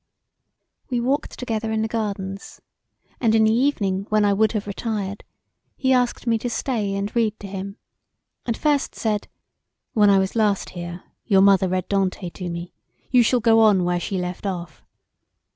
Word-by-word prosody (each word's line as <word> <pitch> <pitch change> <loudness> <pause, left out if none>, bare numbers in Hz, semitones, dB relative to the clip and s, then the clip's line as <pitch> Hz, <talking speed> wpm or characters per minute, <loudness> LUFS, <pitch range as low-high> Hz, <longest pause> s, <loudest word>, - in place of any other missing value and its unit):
We 245 -2 0
walked 270 +5 -1
together 225 -3 -3
in 220 0 0
the - - 0
gardens 200 -3 -4 0.6
and 225 -3 +3
in 220 - +5
the 220 0 +4
evening 205 -7 0
when 215 -1 +3
I 200 - +3
would 215 +2 +2
have 210 -2 -2
retired 205 -1 -4 0.5
he 265 -1 +2
asked 245 -1 +1
me 230 -2 +2
to 245 - -3
stay 220 -4 -1
and 200 +3 -3
read 220 -2 +1
to - - -9
him; 195 +1 -6 0.7
and 230 -2 -2
first 290 -3 0
said, 210 -2 -1 0.7
"When 210 -2 +5
I 200 - +6
was 190 +2 0
last 210 -3 +1
here 175 0 -7 0.2
your 195 -2 +4
mother 195 -1 +5
read 185 0 -1
Dante 190 -2 -1
to 180 0 -6
me; 170 +1 -6 0.4
you 250 -1 +6
shall 240 +1 +2
go 225 +1 +5
on 210 -4 +5
where 175 0 0
she 190 +2 -3
left 180 +2 -4
off." 175 -4 -6
205 Hz, 175 wpm, -23 LUFS, 190-225 Hz, 0.7 s, I